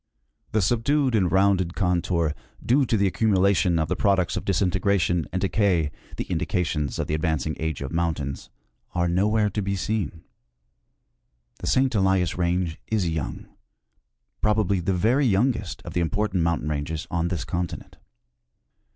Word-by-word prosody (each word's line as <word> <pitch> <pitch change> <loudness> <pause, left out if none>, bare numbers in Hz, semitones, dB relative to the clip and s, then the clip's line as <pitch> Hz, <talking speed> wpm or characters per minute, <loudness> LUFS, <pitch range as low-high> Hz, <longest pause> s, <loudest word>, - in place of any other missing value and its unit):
The 110 -2 +2
subdued 130 +6 +2
and 95 -6 +2
rounded 95 -2 +2
contour, 85 -4 +1 0.3
due 130 +2 +3
to 110 - +2
the 100 - +2
accumulation 95 -3 +2
of 80 -1 0
the - - -1
products 95 -4 +1
of - - -3
disintegration 95 -3 +1
and 95 - -1
decay, 95 -6 +1 0.3
the - - -1
indications 75 -6 -1
of - - -1
the - - -3
ad 75 - -1
vancing 80 -2 -1
age 80 -3 -2
of 70 - -5
mountains, 80 -5 -2 0.5
are 90 0 +2
nowhere 105 +4 +2
to 105 - -2
be 100 0 -1
seen. 95 -5 -3 1.4
The - - -5
St. 130 -1 +2
Elias 95 -5 +2
range 85 -1 -1
is 105 -5 0
young; 75 -7 -3 1.0
probably 105 -3 +2
the 90 +2 0
very 125 +9 +3
youngest 105 -2 0
of - - -8
the 90 - 0
important 100 +1 0
mountain 85 -2 0
ranges 75 +2 -3
on 85 0 0
this 85 -6 -3
continent. 85 -1 -4
90 Hz, 150 wpm, -25 LUFS, 85-105 Hz, 1.4 s, due